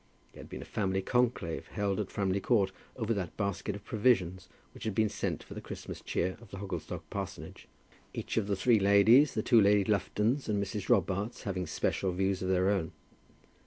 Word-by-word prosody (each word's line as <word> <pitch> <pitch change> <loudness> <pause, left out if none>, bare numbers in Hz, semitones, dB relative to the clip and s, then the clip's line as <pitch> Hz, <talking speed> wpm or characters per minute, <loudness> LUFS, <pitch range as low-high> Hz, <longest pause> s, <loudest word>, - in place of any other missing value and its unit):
There - - -11
had - - -12
been - - -7
a - - -13
family 95 -2 -1
conclave 120 -8 0
held 100 -1 -1
at 105 - -2
Framley 100 -1 0
Court 100 -3 +2 0.2
over 115 -2 -1
that 95 -6 -4
basket 100 -1 -2
of 100 0 -10
provisions 95 -5 +1 0.2
which - - -9
had 110 -3 -2
been 110 -1 +3
sent - - -3
for - - -10
the - - -7
Christmas - - -8
cheer 95 +2 -1
of 115 - -14
the 100 - -8
Hogglestock 90 -3 -5
parsonage, 100 -2 -6 0.4
each - - -5
of 110 -3 +1
the 100 - +1
three 110 +3 +4
ladies, 100 +8 +6
the 110 - 0
two 115 -3 +5
Lady 100 0 +5
Luftons 105 +6 0
and 105 - +1
Mrs. 100 0 -4
Robarts, 100 0 +1
having 95 -3 -3
special 95 - -1
views 95 +1 0
of 95 - -2
their 95 +1 +3
own. 90 -6 -1
100 Hz, 200 wpm, -31 LUFS, 95-110 Hz, 0.4 s, ladies